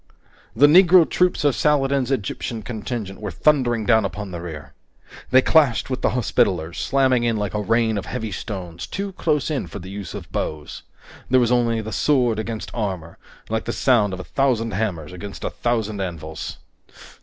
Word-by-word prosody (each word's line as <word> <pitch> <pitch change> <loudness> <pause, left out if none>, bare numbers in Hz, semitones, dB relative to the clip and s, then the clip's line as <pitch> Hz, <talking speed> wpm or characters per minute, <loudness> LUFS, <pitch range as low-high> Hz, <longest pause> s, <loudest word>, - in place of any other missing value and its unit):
The 135 +6 +6
Negro 175 +2 +7
troops 180 -4 +1
of 145 -2 +3
Saladin's 140 -3 +2
Egyptian 115 -2 -3
contingent 110 -3 -5
were 105 - -3
thundering 120 - +2
down 110 -1 +4
upon 100 0 -5
the 85 -1 -6
rear! 75 -5 -8 0.6
They 130 0 +5
clashed 140 -6 +3
with 130 -1 -2
the - - +2
Hospitallers, 85 -8 0
slamming 130 -3 +2
in 115 -2 +1
like 105 -2 -2
a 105 - -1
rain 110 0 +1
of - - -8
heavy 110 -4 -4
stones, 90 -3 -6
too 200 - -4
close 155 -5 0
in 135 - -2
for - - -8
the 95 +2 -9
use 100 -4 -7
of - - -8
bows. 75 -1 -4 0.5
There 130 - +5
was 120 -1 +2
only 115 -2 +2
the 110 0 -6
sword 125 -7 +2
against 110 0 -5
armor, 95 -7 -4 0.3
like 110 0 -2
the 120 - -2
sound 110 -7 +2
of 95 - -5
a - - -5
thousand 120 -1 0
hammers 90 -6 -3
against 100 +3 -8
a - - -2
thousand 110 -4 -1
anvils. 80 -4 -5
110 Hz, 180 wpm, -22 LUFS, 95-130 Hz, 0.6 s, Negro